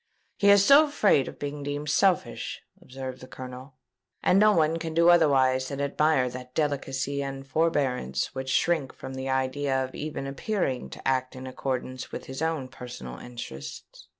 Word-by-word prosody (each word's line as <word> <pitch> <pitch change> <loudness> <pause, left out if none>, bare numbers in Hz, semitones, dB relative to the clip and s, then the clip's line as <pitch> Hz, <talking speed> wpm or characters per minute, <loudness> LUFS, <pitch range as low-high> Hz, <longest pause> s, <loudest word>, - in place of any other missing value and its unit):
"He 200 - +5
is 200 -1 +7
so 285 +5 +8
afraid 210 - +3
of - - -8
being 145 0 -5
deemed 145 +1 -3
selfish," 190 -1 +1 0.2
observed 130 0 -7
the 130 - -10
Colonel; 130 +1 -9 0.5
"and 190 - +5
no 215 +1 +6
one 160 -3 +2
can 160 -1 -5
do 170 +1 +5
otherwise 135 -6 +4
than 140 0 -5
admire 140 -1 +2
that 125 0 -8
delicacy 140 -2 -1
and 135 -1 -5
forbearance 135 - 0
which 130 0 -4
shrink 155 -1 +1
from 130 - -8
the 130 0 -4
idea 130 +1 0
of 130 - -11
even 150 -2 -5
appearing 135 - -2
to 65 - -7
act 130 -1 0
in 130 0 -8
accordance 130 0 -4
with - - -6
his 130 +2 -7
own 160 -5 -1
personal 120 - -9
interests. 70 - -9
135 Hz, 170 wpm, -27 LUFS, 130-155 Hz, 0.5 s, so